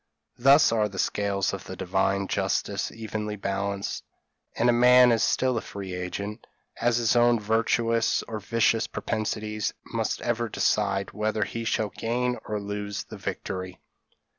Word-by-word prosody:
Thus 140 +3 +6
are 110 -2 +1
the 95 - -10
scales 100 0 0
of - - -6
Divine 100 0 -1
justice - - -1
evenly 110 -1 -4
balanced, 100 0 -3 0.5
and 120 0 +3
man 125 0 +7
is 115 -1 +2
still 130 -2 +2
a - - -8
free 95 -2 -7
agent, 95 +3 -5 0.3
as 120 0 +2
his 120 0 +2
own 120 -1 +4
virtuous 115 +1 +1
or 110 -1 -5
vicious 115 +2 +1
propensities 110 -1 -3
must - - -2
ever 120 -1 -1
decide 100 -3 0
whether 110 0 -1
he 115 +3 -5
shall 110 -1 0
gain 125 +3 -1
or 105 -1 -2
lose 100 0 -4
the - - -10
victory." 90 -1 -5
110 Hz, 140 wpm, -26 LUFS, 100-115 Hz, 0.5 s, man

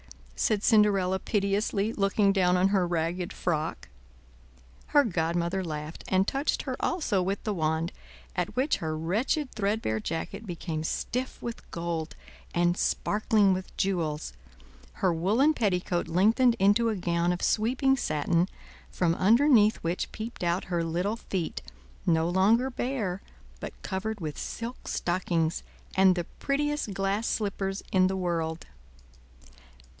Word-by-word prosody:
said 215 -2 +1
Cinderella 195 -4 +4
piteously, 200 +1 0
looking 200 0 +2
down 180 -2 +3
on 185 +2 +3
her 190 -3 +2
ragged 175 +1 -1
frock. 160 -3 -2 1.0
Her 290 - +5
godmother 170 -1 0
laughed, 155 -1 -6
and 190 +1 +2
touched 275 +2 0
her 260 -2 -3
also 270 - 0
with 195 +2 -2
the 215 - -1
wand; 160 -1 0 0.4
at 180 -1 -2
which 265 +4 +2
her 155 -1 -3
wretched 225 - 0
threadbare 200 - -1
jacket 200 - -4
became 165 -3 -4
stiff 250 +10 -3
with 235 0 -6
gold, 170 -2 -3 0.4
and 175 0 +3
sparkling 210 0 +2
with 185 0 -6
jewels; 160 - -1 0.6
her 175 - +1
woolen 215 - +3
petticoat 180 - 0
lengthened 220 +8 +4
into 205 +3 +4
a 220 - 0
gown 175 -1 0
of 180 - -3
sweeping 255 +5 +2
satin, 170 - 0 0.4
from 170 -2 +1
underneath 225 - +5
which 170 +2 -2
peeped 220 -3 -6
out 175 +1 +1
her 175 -2 -1
little 180 +7 -1
feet, 185 -7 -3 0.5
no 165 -1 +3
longer 215 +9 +3
bare, 235 -8 -2 0.4
but - - -8
covered 210 +3 -3
with 155 -4 -5
silk 235 +2 -6
stockings, 175 -2 0 0.3
and 190 -1 +5
the 175 - -1 0.2
prettiest 295 -3 -1
glass 195 +3 0
slippers 195 -2 -2
in 185 -1 +4
the 190 0 -1
world. 165 -3 -2
190 Hz, 135 wpm, -28 LUFS, 170-220 Hz, 1.0 s, Her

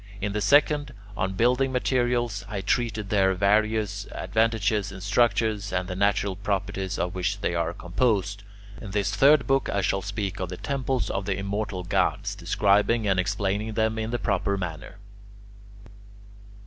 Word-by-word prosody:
In 100 0 -2
the 105 - -1
second, 145 +4 +3 0.2
on 95 0 -1
building 125 +5 +2
materials, 120 -4 0
I 100 -3 -3
treated 110 0 -1
their 95 -2 +3
various 105 0 +1
advantages 110 -2 0
in 95 - -9
structures, 105 0 +1
and 90 0 -1
the 90 - -4
natural 100 0 +1
properties 95 -1 -2
of 90 0 -2
which 95 +3 -2
they 90 - 0
are 85 -1 0
composed. 100 +2 -1 0.4
In 105 - -7
this 100 0 -1
third 145 0 +5
book 135 0 +1
I 100 - 0
shall 95 0 0
speak 100 -1 -4
of 95 -2 -3
the 90 - -6
temples 135 0 -2
of 95 - -2
the 95 - 0
immortal 100 -1 -3
gods, 90 - 0
describing 105 +2 +2
and 95 -2 +2
explaining 100 +3 -1
them 110 0 0
in 110 0 -2
the 120 - -1
proper 100 -3 0
manner. 90 -1 -6
100 Hz, 160 wpm, -26 LUFS, 95-110 Hz, 0.4 s, third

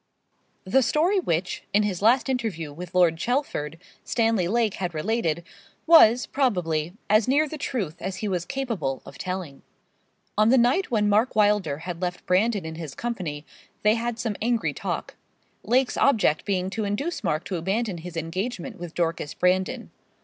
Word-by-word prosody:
The 255 +8 +3
story 325 - +2
which, 180 - -1
in 210 - +5
his 195 -3 -2
last 240 +6 +4
interview 220 - -2
with 175 +3 -9
Lord 175 -3 +4
Chelford, 165 - -2 0.3
Stanley 225 -6 +1
Lake 225 0 +1
had 180 -3 -4
related, 170 -2 -1 0.4
was, 250 -8 +7
probably, 175 - 0
as 215 +1 +4
near 290 +4 +3
the 305 +1 -7
truth 190 - -3
as 190 +1 -3
he 210 - -4
was 180 -4 -1
capable 220 - -3
of 140 - -12
telling. 180 -6 -5 0.8
On 215 +1 +5
the 260 - +5
night 255 +11 +3
when 210 -3 +2
Mark 215 +4 +2
Wylder 205 -8 +2
had 175 -1 -5
left 180 -1 -3
Brandon 200 +1 +2
in 160 - -5
his 150 -5 -7
company 175 -11 -4 0.4
they 210 +1 +5
had 235 0 -2
some 225 -2 -2
angry 235 0 0
talk; - - -4 0.4
Lake's 255 +2 +1
object 210 - +3
being 190 -2 -1
to 220 - -2
induce 215 +13 -2
Mark 160 -3 0
to 185 - -3
abandon 195 +2 -1
his 170 0 -8
engagement 195 - -4
with 175 -2 -8
Dorcas 165 -3 -2
Brandon. 185 +1 0
200 Hz, 165 wpm, -25 LUFS, 170-235 Hz, 0.8 s, was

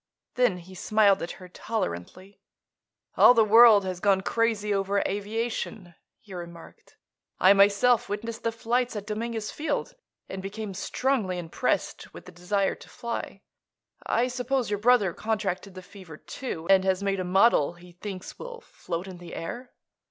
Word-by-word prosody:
Then 245 -7 +2
he 180 +2 -13
smiled 200 +1 +3
at 170 - -4
her 185 - -12
tolerantly. 185 - -5 0.8
"All 245 - +8
the 225 -2 +5
world 220 -2 +7
has 185 -1 -4
gone 195 -1 +3
crazy 215 -1 0
over 200 0 0
aviation," 205 -2 -4 0.3
he 205 - -14
remarked. 170 -2 -11 0.4
"I, 185 +3 +7
myself, 205 +5 +4
witnessed 225 +2 -5
the 230 - -1
flights 240 +2 -1
at 205 -1 -5
Dominguez 220 0 -4
Field 320 +10 -3 0.3
and 190 - -6
became 200 +1 -6
strongly 210 -1 -1
impressed 175 +8 -2
with - - -11
the - - -11
desire 185 +3 -1
to - - -14
fly. 235 -4 -6 0.6
I 240 +2 +1
suppose 250 -1 -2
your 205 - -1
brother 215 -5 +3
contracted 200 -3 -3
the 185 - -9
fever, 180 -6 -12
too, 170 - -7
and 195 -1 +5
has 190 0 0
made 195 -1 0
a - - -1
model 180 -3 +3
he 175 +1 -16
thinks 185 +1 -8
will 485 -1 -8
float 175 - -6
in 185 -2 -9
the 175 -1 -9
air." 245 +9 -6
200 Hz, 160 wpm, -26 LUFS, 185-230 Hz, 0.8 s, All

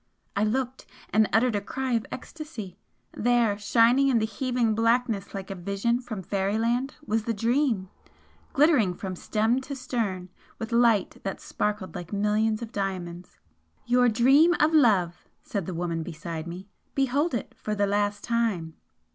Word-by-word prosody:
I 205 - +2
looked, 255 +4 -2 0.2
and 215 -1 +3
uttered 225 +2 +3
a 205 - 0
cry 260 +5 -3
of 230 -2 0
ecstasy 260 - -8 0.3
there, 240 -2 +2
shining 235 +6 +4
in 260 -3 +3
the 220 - +2
heaving 240 0 0
blackness 225 -2 +1
like 195 0 -6
a - - -1
vision 200 +6 -1
from 220 -6 -6
fairyland, 225 - 0
was 220 -2 0
the 230 - -1
'Dream' 230 -2 +1 0.6
glittering 275 - +4
from 190 0 -5
stem 220 +7 0
to 280 +1 -6
stern 225 -8 -3 0.3
with 225 +1 -6
light 235 -4 +3
that 195 - -4
sparkled 210 -5 -3
like 175 -1 -7
millions 215 +2 +1
of 225 - -7
diamonds! 180 -3 -4 0.5
"Your 245 0 +4
Dream 270 +10 +5
of 310 +2 +3
Love!" 195 - +3 0.2
said 200 -6 -3
the 185 - -4
woman 170 -1 -2
beside 160 0 -6
me 180 +3 -7 0.3
"Behold 275 +3 +1
it 235 - -4
for 215 - -3
the 205 0 +2
last 205 0 0
time!" 220 -9 -1
220 Hz, 155 wpm, -26 LUFS, 195-245 Hz, 0.6 s, Dream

